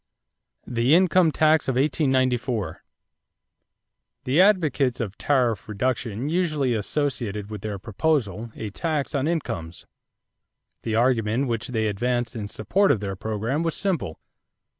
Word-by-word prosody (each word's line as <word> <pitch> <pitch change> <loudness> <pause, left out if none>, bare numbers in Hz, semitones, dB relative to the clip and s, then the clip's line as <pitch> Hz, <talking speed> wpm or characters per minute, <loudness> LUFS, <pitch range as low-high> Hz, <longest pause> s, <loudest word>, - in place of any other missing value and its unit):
=The 120 +4 +3
Income 180 -2 +4
Tax 155 0 +3
of 130 - 0
1894.= 130 - +1 1.5
The 140 +7 +3
advocates 155 - +3
of 105 -4 -3
tariff 120 -8 +1
reduction 115 +2 -2
usually 155 -6 +1
associated 110 -3 -2
with 105 -3 -6
their 105 -1 -4
proposal 115 - -1
a 105 -2 -5
tax 155 - -2
on 140 0 0
incomes. 90 - -3 1.0
The 110 -1 -2
argument 120 +1 +2
which 115 +1 -2
they 115 -4 -1
advanced 120 +4 -1
in 105 -3 -4
support 185 - +1
of 120 - +1
their 100 -1 -4
program 110 - -2
was 165 -1 -1
simple. 170 - -2
125 Hz, 125 wpm, -24 LUFS, 110-150 Hz, 1.5 s, Income